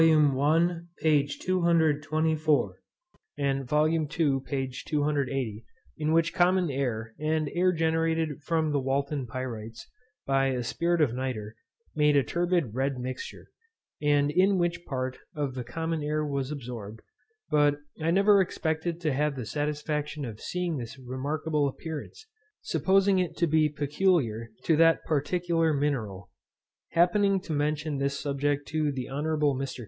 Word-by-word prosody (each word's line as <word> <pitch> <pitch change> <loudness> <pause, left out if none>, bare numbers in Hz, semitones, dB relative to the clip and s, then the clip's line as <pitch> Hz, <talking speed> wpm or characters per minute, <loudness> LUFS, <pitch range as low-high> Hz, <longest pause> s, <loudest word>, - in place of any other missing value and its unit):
I, 155 +2 +4 0.2
p. 150 -3 +3
224. 155 - +1 0.6
and 135 -2 -1
VOL. 150 +2 +4
II, 160 -1 0 0.4
p. 135 -2 -3
280. 135 -7 -1 0.3
in 155 0 -1
which 165 +1 +2
common 180 -2 +3
air, 115 -5 -2
and 155 0 0
air 180 +1 +3
generated 160 -2 0
from 160 0 0
the 145 - +1
Walton 140 0 -1
pyrites, 115 -2 -6 0.4
by 135 -2 +1
spirit 170 +7 0
of 135 -6 +3
nitre, 120 -5 -4 0.4
made 150 -1 +4
a 140 - +4
turbid 175 - 0
red 135 +2 -1
mixture, 130 +1 -6 0.5
and 145 -1 +3
in 190 +4 +3
which 175 -1 0
part 130 -1 -3 0.2
of 145 -3 -2
the 125 -1 -4
common 160 +6 -3
air 150 +1 -1
was 140 -2 -2
absorbed; 115 -7 -7 0.5
but 145 -1 +4 0.3
I 160 - +1
never 200 +3 +5
expected 165 -1 -2
to 155 -4 0
have 150 +1 0
the 125 -4 -5
satisfaction 150 +1 -2
of 110 -3 -7
seeing 180 -3 -2
this 120 +1 -7
remarkable 145 +4 -1
appearance, 160 - -7 0.4
supposing 195 0 +3
it 180 -2 -2
to 170 - +3
be 155 -1 +3
peculiar 145 - 0
to 160 - +3
that 165 0 +4
particular 165 +1 +1
mineral. 110 -11 -2 0.6
Happening 195 +3 +3
to 175 -4 -5
mention 150 0 -1
this 140 0 -1
subject 145 0 -1
to 155 -1 0
the 130 -3 -4
Hon. 145 +3 -3 0.3
Mr. 135 0 -4
150 Hz, 140 wpm, -28 LUFS, 135-165 Hz, 0.6 s, never